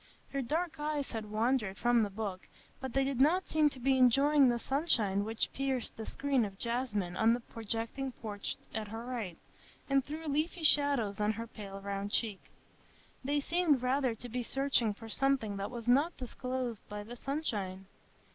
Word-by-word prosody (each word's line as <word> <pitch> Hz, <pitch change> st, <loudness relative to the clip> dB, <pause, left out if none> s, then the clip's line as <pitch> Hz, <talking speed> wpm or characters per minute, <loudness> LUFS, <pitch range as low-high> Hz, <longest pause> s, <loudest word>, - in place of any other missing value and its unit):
Her 275 Hz, -, 0 dB
dark 305 Hz, +3 st, -1 dB
eyes 295 Hz, -2 st, -2 dB
had 220 Hz, -2 st, -4 dB
wandered 215 Hz, -2 st, +1 dB
from 240 Hz, -1 st, +4 dB
the 210 Hz, -, +1 dB
book, 195 Hz, -2 st, -5 dB, 0.3 s
but 265 Hz, -3 st, -5 dB
they 270 Hz, -, +3 dB
did 270 Hz, -1 st, 0 dB
not 350 Hz, +7 st, +4 dB
seem 310 Hz, -1 st, +4 dB
to 270 Hz, -, -10 dB
be 265 Hz, +1 st, +3 dB
enjoying 275 Hz, +2 st, +6 dB
the 240 Hz, -, +2 dB
sunshine 230 Hz, -, +1 dB
which 220 Hz, +2 st, -1 dB
pierced 265 Hz, -2 st, -1 dB
the 220 Hz, -, -6 dB
screen 275 Hz, -3 st, +1 dB
of 195 Hz, -2 st, -5 dB
jasmine 230 Hz, -7 st, -1 dB
on 225 Hz, +3 st, +4 dB
the -, -, -4 dB
projecting 230 Hz, +4 st, -4 dB
porch 205 Hz, -3 st, -4 dB, 0.2 s
at 220 Hz, -1 st, -3 dB
her 225 Hz, +3 st, -6 dB
right, 225 Hz, -9 st, -4 dB, 0.5 s
and 275 Hz, -1 st, +3 dB
threw 310 Hz, +4 st, -6 dB
leafy 310 Hz, +4 st, -1 dB
shadows 280 Hz, -10 st, +3 dB
on 210 Hz, +1 st, +2 dB
her 230 Hz, +2 st, -5 dB
pale 200 Hz, -3 st, -8 dB
round 200 Hz, 0 st, -3 dB
cheek; 210 Hz, -4 st, 0 dB, 0.8 s
they 290 Hz, +2 st, +1 dB
seemed 310 Hz, -4 st, +2 dB
rather 255 Hz, -2 st, +2 dB
to 235 Hz, +3 st, -9 dB
be 245 Hz, +1 st, -2 dB
searching 260 Hz, -3 st, +2 dB
for 225 Hz, +2 st, -9 dB
something 230 Hz, -3 st, +1 dB
that 200 Hz, +1 st, -3 dB
was 240 Hz, -2 st, -7 dB
not 285 Hz, +8 st, +4 dB
disclosed 250 Hz, -2 st, -3 dB
by 205 Hz, 0 st, -5 dB
the 235 Hz, +3 st, -8 dB
sunshine. 210 Hz, -9 st, -3 dB
245 Hz, 180 wpm, -33 LUFS, 215-275 Hz, 0.8 s, enjoying